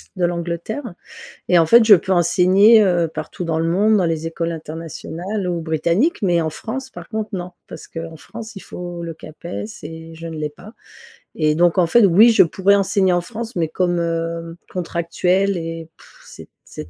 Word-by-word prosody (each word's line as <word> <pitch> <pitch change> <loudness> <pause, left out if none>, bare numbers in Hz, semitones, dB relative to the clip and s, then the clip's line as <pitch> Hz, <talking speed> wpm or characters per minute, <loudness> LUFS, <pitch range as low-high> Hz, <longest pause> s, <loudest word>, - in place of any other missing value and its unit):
de 180 - +1
l'Angleterre. 175 - -4 0.5
Et 180 - +5
en 165 - +4
fait 235 +7 +6
je 215 -2 +8
peux 190 +2 -3
enseigner, 190 +5 +5
heu, 175 -3 +2
partout 155 +3 -6
dans 165 -1 -1
le 165 - 0
monde, 210 +5 +3
dans 185 - +2
les 165 0 -2
écoles 165 0 -3
internationales 165 +5 -6
ou 170 -1 -2
britanniques 170 - 0
mais 175 -3 +2
en 160 -1 -2
France 265 - -6
par 170 -1 -11
contre 220 -1 -3
non. 180 0 -5 0.2
Parce - - -10
qu'en 165 -1 -7
France 220 +6 -10
il 195 - -8
faut 175 -1 -7
le 165 -1 -5
CAPES 165 +5 -8 0.2
et 160 +1 -9
je 165 +1 -8
ne 160 -1 -7
l'ai 150 -1 -3
pas. 205 +9 -14 0.6
Et 155 -1 +2
donc 175 +2 +2
en 180 - +4
fait, 225 +5 +5
oui 210 +6 +6
je - - +5
pourrais 190 +4 +2
enseigner 195 -2 +2
en 175 - +1
France 230 +5 -7
mais 165 -2 0
comme, 175 0 0
heu, 165 0 -3 0.2
contractuelle, 180 +2 0
et, 165 -1 -6
pff, - - -20
c'est 485 - -12 0.2
c'est - - -9
175 Hz, 195 wpm, -20 LUFS, 165-200 Hz, 0.6 s, je